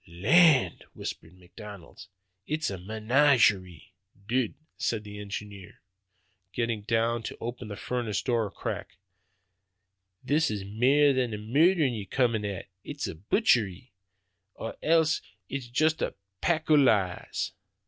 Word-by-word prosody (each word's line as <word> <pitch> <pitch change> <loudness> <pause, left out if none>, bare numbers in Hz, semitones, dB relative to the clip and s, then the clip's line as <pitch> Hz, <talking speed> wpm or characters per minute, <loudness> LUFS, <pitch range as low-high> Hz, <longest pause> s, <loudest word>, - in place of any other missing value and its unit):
'Land,' 135 - +4
whispers 80 - -6
McDonald, 90 -1 -12 0.4
'it's 155 -5 -1
a 95 - -5
meenadgerie!'" 105 - +2 0.3
"Dud," 120 -1 0 0.2
said 110 -2 -2
the 105 -1 -9
engineer, 100 -2 -8 0.7
getting 115 -3 -1
down 115 +2 0
to - - -7
open 120 -1 -6
the 105 - -6
furnace 115 -3 -2
door 120 -4 +1
a - - -8
crack, 95 - -6 1.3
"this 150 +1 +2
is 100 -2 -4
mair 135 +8 +4
than 130 -2 +1 0.2
murder 165 +2 +5
ye're 115 -6 -2
comin' 115 -4 +1
at; 100 -3 -5 0.2
it's - - -5
a - - -4
buitchery 105 - +1 0.6
or 115 - -6
else 160 -1 +3 0.3
it's 135 -2 -4
juist 155 +6 +1
a - - -2 0.3
pack 160 -2 0
o' - - +8
lees." 105 -11 +2
115 Hz, 130 wpm, -28 LUFS, 100-140 Hz, 1.3 s, o